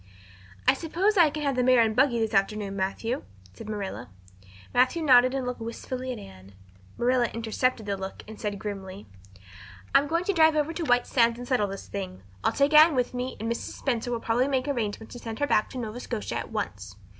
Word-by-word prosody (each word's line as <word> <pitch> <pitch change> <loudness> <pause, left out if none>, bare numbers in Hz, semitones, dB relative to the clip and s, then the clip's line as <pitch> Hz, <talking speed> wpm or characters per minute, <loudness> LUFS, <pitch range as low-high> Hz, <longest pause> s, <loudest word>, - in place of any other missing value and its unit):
"I - - +7
suppose 365 +6 0
I 340 -5 +6
can 300 +1 -5
have 280 -2 0
the 250 - +2
mare 250 -1 +5
and 220 -1 0
buggy 260 -1 +3
this 225 -1 -1
afternoon, 200 0 0
Matthew?" 200 +6 -2 0.3
said 210 - -10
Marilla. 195 - -5 0.6
Matthew 255 +7 +3
nodded 255 -2 +6
and 265 -2 -2
looked 250 0 -4
wistfully 255 +3 -5
at 245 - -5
Anne. 95 0 -13 0.4
Marilla 245 0 +2
intercepted 230 +1 -1
the 200 -1 -1
look 190 0 -7
and 220 0 -10
said 205 -1 -2
grimly: 195 -1 -7 0.9
"I'm 285 - +5
going 335 +3 0
to 400 - 0
drive 320 -2 +5
over 305 +2 0
to 335 0 -3
White 245 -2 +3
Sands 235 -2 +2
and 245 0 -8
settle 245 -6 +2
this 195 0 -7
thing. 185 - -6 0.2
I'll - - +3
take 280 +2 +2
Anne 310 0 +8
with 250 -1 0
me 250 +1 -4
and 225 - -3
Mrs. 235 0 -3
Spencer 245 -3 -2
will 235 - -1
probably 235 +3 +1
make 265 -1 0
arrangements 220 -5 -3
to 245 - -8
send 225 -2 -6
her 290 - +1
back 215 -6 +2
to 260 - -8
Nova 235 -1 -5
Scotia 235 -3 -4
at - - -6
once. - - -5
245 Hz, 215 wpm, -27 LUFS, 215-270 Hz, 0.9 s, Anne